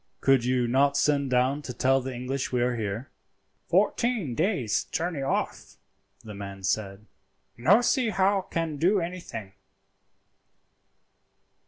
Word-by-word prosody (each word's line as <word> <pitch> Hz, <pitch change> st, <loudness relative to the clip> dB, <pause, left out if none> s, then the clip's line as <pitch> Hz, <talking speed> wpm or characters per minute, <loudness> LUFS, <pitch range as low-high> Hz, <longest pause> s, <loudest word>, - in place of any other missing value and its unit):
"Could 135 Hz, -3 st, +3 dB
you 125 Hz, -1 st, +1 dB
not 140 Hz, +3 st, +3 dB
send 140 Hz, -2 st, +2 dB
down 130 Hz, +3 st, +1 dB
to 125 Hz, -4 st, -7 dB
tell 135 Hz, +2 st, +2 dB
the 130 Hz, +1 st, -5 dB
English 130 Hz, +2 st, -3 dB
we 125 Hz, -1 st, +1 dB
are 125 Hz, 0 st, 0 dB
here?" 110 Hz, +4 st, -4 dB, 0.6 s
"Fourteen 230 Hz, -, +1 dB
days' 130 Hz, -, 0 dB
journey 165 Hz, -3 st, -3 dB
off," 135 Hz, -, -3 dB, 0.5 s
the 110 Hz, -, -9 dB
man 100 Hz, -1 st, -8 dB
said; 100 Hz, +1 st, -2 dB, 0.5 s
"no 185 Hz, -, +4 dB
see 245 Hz, -1 st, +2 dB
how 195 Hz, -1 st, +2 dB
can 165 Hz, -4 st, -3 dB
do 185 Hz, +7 st, +3 dB
anything." 170 Hz, -, -6 dB
135 Hz, 130 wpm, -27 LUFS, 120-170 Hz, 0.6 s, no